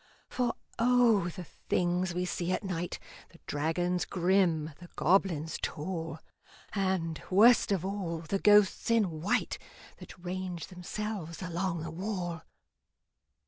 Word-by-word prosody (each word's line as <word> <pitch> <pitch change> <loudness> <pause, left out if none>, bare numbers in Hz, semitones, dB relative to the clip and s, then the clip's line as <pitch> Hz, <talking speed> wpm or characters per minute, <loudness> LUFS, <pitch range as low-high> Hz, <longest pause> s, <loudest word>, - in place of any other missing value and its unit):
For 250 -2 0 0.2
O! 235 -5 +4
the 180 +1 -7
things 175 +1 -1
we 180 0 0
see 180 0 -2
at 185 - -1
night 180 -3 -3 0.3
The - - -18
dragons 175 +4 0
grim, 175 -4 +2
the 175 -1 -12
goblins 170 -3 +2
tall, 165 0 -3 0.6
And, 185 -5 -1
worst 220 +4 +6
of 190 -3 +1
all, 185 -5 -3
the 180 +5 -2
ghosts 210 +1 +5
in 195 -9 +2
white 190 - 0 0.4
That - - -11
range 180 -1 -5
themselves 185 -1 -5
along 175 -1 -2
the 165 - -5
wall! 175 -2 -3
180 Hz, 125 wpm, -30 LUFS, 170-195 Hz, 0.6 s, worst